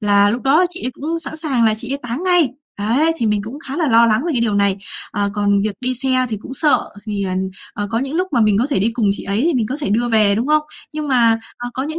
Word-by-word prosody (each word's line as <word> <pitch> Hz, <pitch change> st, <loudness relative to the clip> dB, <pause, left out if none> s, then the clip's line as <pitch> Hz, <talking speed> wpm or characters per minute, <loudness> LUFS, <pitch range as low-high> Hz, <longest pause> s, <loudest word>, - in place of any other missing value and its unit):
là 205 Hz, -1 st, +4 dB
lúc 240 Hz, +3 st, -3 dB
đó 300 Hz, +7 st, +4 dB
chị 360 Hz, +1 st, -4 dB
ấy -, -, -1 dB
cũng 320 Hz, +6 st, -4 dB
sẵn 315 Hz, -1 st, -4 dB
sàng 275 Hz, -7 st, 0 dB
là 220 Hz, -1 st, +4 dB
chị 245 Hz, +4 st, -3 dB
ấy 280 Hz, -, -2 dB
táng 245 Hz, +6 st, -4 dB
ngay. 355 Hz, -5 st, +3 dB, 0.3 s
Đấy, 260 Hz, +11 st, +2 dB
thì 235 Hz, -, -1 dB
mình 210 Hz, -1 st, +1 dB
cũng 245 Hz, +7 st, -7 dB
khá 275 Hz, -, -4 dB
là 325 Hz, -3 st, +1 dB
lo 230 Hz, -1 st, +6 dB
lắng 220 Hz, +1 st, +2 dB
về 340 Hz, -, 0 dB
cái 245 Hz, -, +1 dB
điều 220 Hz, -3 st, +1 dB
này. 200 Hz, -1 st, +3 dB, 0.3 s
Ờ, 200 Hz, 0 st, 0 dB
còn 200 Hz, -1 st, +2 dB
việc 215 Hz, -, -1 dB
đi 255 Hz, 0 st, -1 dB
xe 255 Hz, 0 st, +1 dB
thì 215 Hz, -, -3 dB
cũng 265 Hz, -, -8 dB
sợ 295 Hz, +2 st, +4 dB, 0.3 s
thì, 200 Hz, -2 st, -2 dB
à, 185 Hz, -1 st, -2 dB, 0.4 s
à, 205 Hz, -, -2 dB
có 225 Hz, -, 0 dB
những 270 Hz, +4 st, -3 dB
lúc 365 Hz, +2 st, 0 dB
mà 245 Hz, -, +2 dB
mình 210 Hz, -2 st, +3 dB
có 245 Hz, -, +2 dB
thể 275 Hz, -, +1 dB
đi 215 Hz, +4 st, +1 dB
cùng 225 Hz, -4 st, 0 dB
chị -, -, -2 dB
ấy 200 Hz, +3 st, -1 dB
thì 340 Hz, -, +1 dB
mình 235 Hz, -4 st, +1 dB
có 265 Hz, -, -3 dB
thể 280 Hz, -, -2 dB
đưa 240 Hz, +3 st, +1 dB
về, 215 Hz, -3 st, +4 dB
đúng 235 Hz, +5 st, -1 dB
không? 305 Hz, 0 st, +3 dB, 0.3 s
Nhưng 305 Hz, -1 st, -3 dB
mà, 230 Hz, -3 st, +4 dB, 0.2 s
à, 245 Hz, 0 st, -4 dB
có 260 Hz, -, -2 dB
những 315 Hz, +4 st, -3 dB
240 Hz, 300 wpm, -18 LUFS, 210-285 Hz, 0.4 s, lo